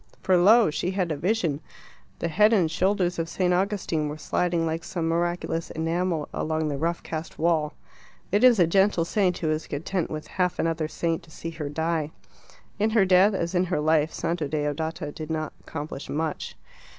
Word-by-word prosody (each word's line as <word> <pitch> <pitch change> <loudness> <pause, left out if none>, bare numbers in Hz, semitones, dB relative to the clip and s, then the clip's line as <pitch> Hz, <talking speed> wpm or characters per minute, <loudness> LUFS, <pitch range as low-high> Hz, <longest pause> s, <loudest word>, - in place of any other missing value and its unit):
For 185 - +4
lo! 205 +2 +6
she 175 - -2
had 185 -3 -1
a - - 0
vision: 170 -3 0 0.6
the - - -2
head 210 +7 +4
and 175 -7 +3
shoulders 185 -2 +1
of 165 0 -2
St. 180 0 +1
Augustine 180 -5 0
were 150 - -6
sliding 170 +1 0
like 160 +1 -2
some 170 -3 -3
miraculous 170 0 -1
enamel 165 0 -1
along 155 0 -1
the 140 - -2
rough 170 +2 -1
cast 160 0 -6
wall. 155 -2 +1 0.6
It 205 +4 +2
is 250 -3 +7
a 175 - +5
gentle 190 0 +3
saint 180 -1 +1
who 155 -2 -1
is 155 +1 -2
content 165 +5 -2
with 155 -1 -5
half 180 -1 -1
another 165 -1 0
saint 165 +1 -2
to - - -20
see 165 +1 -7
her 155 -3 -5
die. 160 0 -1 0.7
In 215 +2 +3
her 215 -3 +4
death, 190 +2 +5
as 170 -1 -2
in 180 0 +2
her 180 -3 -1
life, 155 0 +2
Santa 165 -3 -2
Deodata 150 +1 -2
did 155 +1 -7
not 155 -1 -3
accomplish 145 -2 -7
much. 155 0 -3
165 Hz, 185 wpm, -26 LUFS, 155-185 Hz, 0.7 s, is